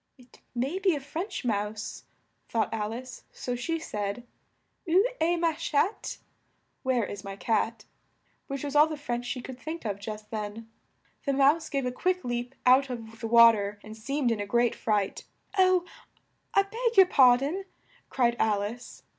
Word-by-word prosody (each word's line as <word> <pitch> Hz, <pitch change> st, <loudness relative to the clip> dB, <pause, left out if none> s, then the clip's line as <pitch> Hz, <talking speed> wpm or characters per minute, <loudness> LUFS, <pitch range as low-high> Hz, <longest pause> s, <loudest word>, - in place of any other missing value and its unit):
"It 250 Hz, -1 st, -20 dB, 0.2 s
may 270 Hz, +10 st, -1 dB
be 375 Hz, -4 st, +3 dB
a -, -, -3 dB
French 315 Hz, +4 st, -5 dB
Mouse," 210 Hz, -1 st, -3 dB, 0.4 s
thought 225 Hz, -1 st, 0 dB
Al 215 Hz, -1 st, -2 dB
ice, 255 Hz, +2 st, -8 dB
so 245 Hz, -, -4 dB
she 330 Hz, +7 st, -2 dB
said: 210 Hz, -4 st, -4 dB, 0.6 s
"Où 365 Hz, +4 st, +5 dB, 0.2 s
est 340 Hz, +2 st, +2 dB
ma 335 Hz, -1 st, +2 dB
chatte?" 325 Hz, +5 st, -1 dB, 0.6 s
(Where 255 Hz, -4 st, +1 dB
is 200 Hz, -1 st, -7 dB
my 195 Hz, 0 st, -6 dB
cat?) 225 Hz, +1 st, -1 dB, 0.6 s
which 275 Hz, -1 st, -4 dB
was 285 Hz, 0 st, -4 dB
all 300 Hz, +1 st, +7 dB
the 310 Hz, -1 st, -5 dB
French 245 Hz, -4 st, -3 dB
she 250 Hz, 0 st, -3 dB
could 255 Hz, 0 st, -9 dB
think 320 Hz, -1 st, -6 dB
of 200 Hz, -2 st, -2 dB
just 210 Hz, +1 st, -7 dB
then. 215 Hz, +1 st, -5 dB, 0.6 s
The 280 Hz, -, +2 dB
Mouse 285 Hz, +4 st, +3 dB
gave 275 Hz, -2 st, -1 dB
a 250 Hz, -, -1 dB
quick 365 Hz, +8 st, -1 dB
leap 245 Hz, +1 st, -3 dB
out 260 Hz, +2 st, +5 dB
of 225 Hz, -2 st, -7 dB
the 225 Hz, -, -3 dB
wa 235 Hz, 0 st, +9 dB
ter, 205 Hz, -1 st, -3 dB
and 215 Hz, 0 st, -9 dB
seemed 250 Hz, +3 st, -1 dB
in 225 Hz, -, -1 dB
a 205 Hz, -, -3 dB
great 240 Hz, +2 st, +2 dB
fright, 205 Hz, -3 st, -1 dB, 0.3 s
"Oh, 370 Hz, -2 st, +4 dB, 0.7 s
I 395 Hz, -, +6 dB
beg 460 Hz, +3 st, -2 dB
your 385 Hz, -, +10 dB
par 255 Hz, -8 st, +6 dB
don," 315 Hz, +9 st, -3 dB, 0.4 s
cried 240 Hz, -2 st, +2 dB
Al 210 Hz, -2 st, +2 dB
ice. 235 Hz, +4 st, -7 dB
245 Hz, 180 wpm, -28 LUFS, 220-305 Hz, 0.7 s, your